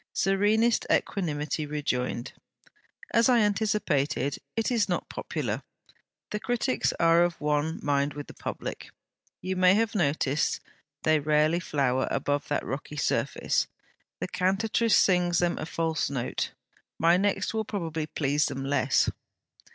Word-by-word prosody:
Serenest 210 +4 +2
equanimity 155 -4 -1
rejoined: 125 -5 -2 0.8
'As 230 +2 +4
I 245 - +5
anticipated, 200 - 0 0.2
it 225 +2 0
is 220 -4 +1
not 175 - -1
popular. - - -3 0.7
The 210 - -2
critics 245 +3 0
are 165 0 +5
of 175 -1 -1
one 150 +2 0
mind 140 0 +1
with 145 -1 -6
the - - -12
public. - - -6 0.5
You 185 +1 -2
may 185 +1 +5
have 225 0 +1
noticed, 150 - +1 0.4
they 155 -1 +4
rarely 155 +3 +2
flower 135 -6 0
above 145 0 -1
that 145 - -1
rocky 140 +3 -5
surface. - - 0 0.5
THE - - -3
CANTATRICE 215 +5 +2
sings 180 -2 +3
them 175 0 +1
a - - -4
false 165 -2 -1
note. 130 -3 -2 0.5
My 165 +1 +4
next 195 +1 0
will 220 0 0
probably 165 -7 -3
please 145 -1 +1
them 135 0 -4
less.' 140 +1 +2
165 Hz, 135 wpm, -27 LUFS, 145-200 Hz, 0.8 s, I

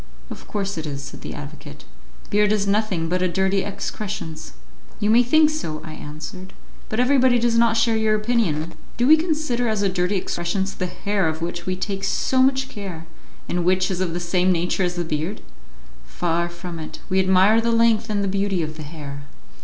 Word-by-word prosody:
"Of - - -9
course 200 -4 -2
it 155 - -4
is," 140 -1 -5
said 145 - -9
the - - -6
advocate. 145 - -10 0.5
"Beard 210 0 +3
is 210 -2 +1
nothing 200 -5 0
but 180 +2 0
a 185 - +3
dirty 190 +2 +1
excrescence." 200 -4 -5 0.5
"You 210 0 +2
may 235 +2 +7
think 305 +5 +4
so," 160 - -4
I 155 - -7
answered, 170 +7 -8 0.4
"but 215 - -2
everybody 255 -1 +4
does 235 -1 +2
not 230 -1 +4
share 230 0 +3
your 220 -1 +2
opinion. 210 -8 0 0.2
Do 240 - +2
we 305 +4 +8
consider 310 -7 0
as 215 -2 0
a 200 - +3
dirty 180 +2 0
excrescence 190 +2 -2
the 185 - -3
hair 200 -1 -1
of 160 +1 -2
which 175 +1 -4
we 185 - 0
take 195 +1 -4
so 260 +6 +1
much 265 0 +3
care, 190 -8 -7 0.4
and 175 0 -1
which 185 +1 +2
is 185 0 -2
of 175 -3 -1
the 175 - -2
same 180 +1 +2
nature 180 +2 0
as 180 -1 0
the 175 - -1
beard? 160 +6 -2 0.6
Far 165 - -1
from 170 -1 -7
it; 155 - -8
we 190 0 +2
admire 190 +4 +5
the 235 - 0
length 230 -1 +3
and 205 -1 0
the - - 0
beauty 195 -2 0
of 155 0 -6
the - - -7
hair." 145 -2 -8
190 Hz, 200 wpm, -22 LUFS, 170-220 Hz, 0.6 s, we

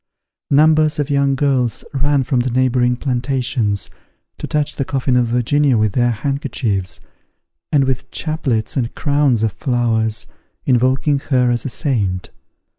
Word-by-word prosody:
Numbers 155 +1 +4
of 145 -1 -2
young 140 -1 +2
girls 135 -4 0
ran 140 0 +1
from 130 0 0
the 125 +1 0
neighbouring 125 0 +2
plantations, 125 -5 -1 0.5
to - - -5
touch 150 -1 -1
the 135 - 0
coffin 130 -1 -1
of 125 -1 +3
Virginia 125 +3 +2
with 110 -1 +2
their 120 -1 +2
handkerchiefs, 115 - -2 0.7
and 145 -2 +4
with 130 -1 -2
chaplets 140 -9 -2
and 120 -4 -2
crowns 140 -6 +1
of 110 - +1
flowers, 110 -4 -1 0.4
invoking 130 +3 +2
her 125 -3 +3
as 120 - -1
a - - -2
saint. 100 - -2
130 Hz, 140 wpm, -18 LUFS, 120-140 Hz, 0.7 s, Numbers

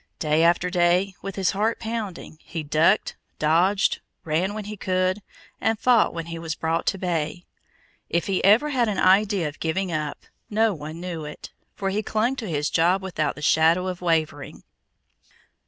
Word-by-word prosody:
Day 155 0 +1
after 175 +2 +3
day, 180 +2 +2
with 195 -1 -6
his 190 -2 +1
heart 215 +3 0
pounding, 220 -8 -5
he 165 -2 -6
ducked, 160 +7 +2 0.2
dodged, 175 +6 +2 0.2
ran 170 +6 -1
when 215 -2 -5
he 210 +1 -6
could, 185 0 0 0.4
and 225 +1 +1
fought 240 0 +4
when 165 -1 -5
he 165 0 -6
was 165 -1 -4
brought 165 +1 -1
to 195 - +1
bay. 175 -2 -2 0.6
If 170 - 0
he 195 -2 -1
ever 220 +10 +5
had 245 -4 +2
an 200 - -2
idea 195 -2 +3
of 150 - -8
giving 175 +3 -1
up, 155 -2 -4 0.2
no 220 0 +2
one 155 0 -8
knew 170 -3 -5
it; 150 - -9 0.2
for 195 -1 -2
he 210 +2 0
clung 220 +4 0
to 225 -6 -5
his 150 -2 -1
job 180 +4 +2
without 155 -6 -2
the 150 - -9
shadow 165 +4 +4
of 185 -1 -4
wavering. 155 -4 -1
180 Hz, 175 wpm, -24 LUFS, 160-200 Hz, 0.6 s, ever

